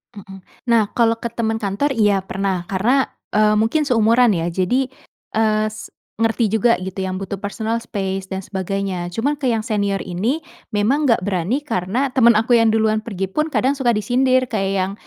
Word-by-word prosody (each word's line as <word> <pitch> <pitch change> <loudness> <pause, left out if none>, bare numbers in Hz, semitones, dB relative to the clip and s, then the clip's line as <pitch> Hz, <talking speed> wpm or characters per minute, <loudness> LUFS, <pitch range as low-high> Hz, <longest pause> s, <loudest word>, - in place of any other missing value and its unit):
Mmm. 195 -1 -11 0.3
Nah 230 -1 +5
kalau 230 -1 +3
ke 235 - -3
teman 225 -1 -2
kantor 210 +7 -1
iya 205 -6 +2
pernah. 190 -1 -2
Karena, 240 +8 +2 0.3
eee, 215 0 +4
mungkin 230 +8 +2
seumuran 235 -2 +4
ya 170 -3 -1
jadi, 190 +10 0 0.5
eee, 215 -1 +2
s 215 0 -9 0.3
ngerti 225 0 +1
juga 225 +3 +3
gitu 190 +1 -6
yang 185 0 -4
butuh 195 +1 -4
personal 220 +3 -3
space 195 -4 -4
dan 190 0 -5
sebagainya. 190 -1 -3
Cuman 285 +9 -1
ke 280 - -4
yang 225 - 0
senior 205 -3 -1
ini 215 - -2 0.3
memang 240 +9 +1
gak 230 -7 +3
berani 190 - -1
karena 240 0 -1
temen 240 -2 +5
aku 225 +3 +3
yang 225 -1 +3
duluan 220 -1 +1
pergi 195 -4 -3
pun 305 +10 0
kadang 275 +2 +1
suka 245 -3 +2
disindir 255 +3 +1
kayak 195 -4 -1
yang 190 0 0
215 Hz, 180 wpm, -20 LUFS, 195-240 Hz, 0.5 s, Nah